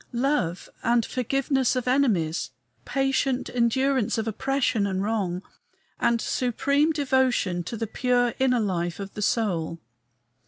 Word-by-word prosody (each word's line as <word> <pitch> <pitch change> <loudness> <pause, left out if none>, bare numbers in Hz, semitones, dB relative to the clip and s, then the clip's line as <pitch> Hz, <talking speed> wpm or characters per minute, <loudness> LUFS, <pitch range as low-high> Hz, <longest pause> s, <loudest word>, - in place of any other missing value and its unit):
Love 235 - 0
and 235 -1 +2
forgiveness 265 +1 0
of 255 -1 -2
enemies; 195 - +1 0.4
patient 270 -1 0
endurance 250 0 +1
of 225 0 -2
oppression 255 -2 0
and 190 0 -1
wrong; 195 -4 -1 0.6
and 235 0 +2
supreme 280 +7 +1
devotion 260 - +1
to 230 +7 -5
the 225 - -2
pure 245 +1 +1
inner 255 -2 +3
life 175 -5 -1
of 195 0 -6
the 210 - -6
soul. 175 -7 0
235 Hz, 125 wpm, -25 LUFS, 200-265 Hz, 0.6 s, inner